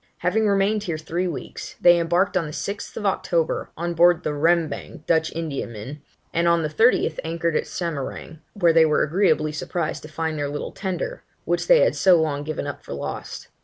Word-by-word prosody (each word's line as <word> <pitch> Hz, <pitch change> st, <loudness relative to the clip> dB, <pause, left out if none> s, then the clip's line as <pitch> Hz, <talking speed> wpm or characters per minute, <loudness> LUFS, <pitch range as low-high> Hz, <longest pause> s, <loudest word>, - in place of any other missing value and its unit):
Having 210 Hz, +5 st, +1 dB
remained 200 Hz, +1 st, +2 dB
here 170 Hz, -6 st, -3 dB
three 170 Hz, +3 st, -2 dB
weeks, 170 Hz, -, -7 dB
they 175 Hz, 0 st, +6 dB
embarked 175 Hz, +4 st, +1 dB
on 180 Hz, -3 st, +1 dB
the -, -, -7 dB
6th 205 Hz, +5 st, -5 dB
October, 170 Hz, -4 st, 0 dB
on 170 Hz, +1 st, -2 dB
board 175 Hz, +1 st, +4 dB
the 150 Hz, -, -1 dB
Rembang 160 Hz, 0 st, 0 dB
Dutch 160 Hz, -1 st, +2 dB
Indiaman, 140 Hz, -4 st, -5 dB, 0.3 s
and 170 Hz, +1 st, +2 dB
on 170 Hz, -1 st, +3 dB
the 155 Hz, -, -1 dB
30th, 165 Hz, -2 st, +2 dB
anchored 165 Hz, 0 st, -1 dB
at -, -, +1 dB
Samarang, 160 Hz, -1 st, -5 dB
where 175 Hz, -5 st, +3 dB
they 165 Hz, 0 st, +6 dB
were 155 Hz, -1 st, +3 dB
agreeably 155 Hz, -2 st, +2 dB
surprised 155 Hz, +1 st, -3 dB
to 150 Hz, -, -10 dB
find 160 Hz, 0 st, -3 dB
their 145 Hz, -1 st, -1 dB
little 145 Hz, +1 st, -5 dB
Tender, 200 Hz, -, -4 dB, 0.2 s
which -, -, -1 dB
they -, -, +6 dB
had -, -, +3 dB
so 185 Hz, -3 st, +5 dB
long 150 Hz, -3 st, 0 dB
given 155 Hz, -1 st, -4 dB
up 145 Hz, -, -6 dB
for -, -, -6 dB
lost. -, -, -6 dB
165 Hz, 190 wpm, -23 LUFS, 155-180 Hz, 0.3 s, they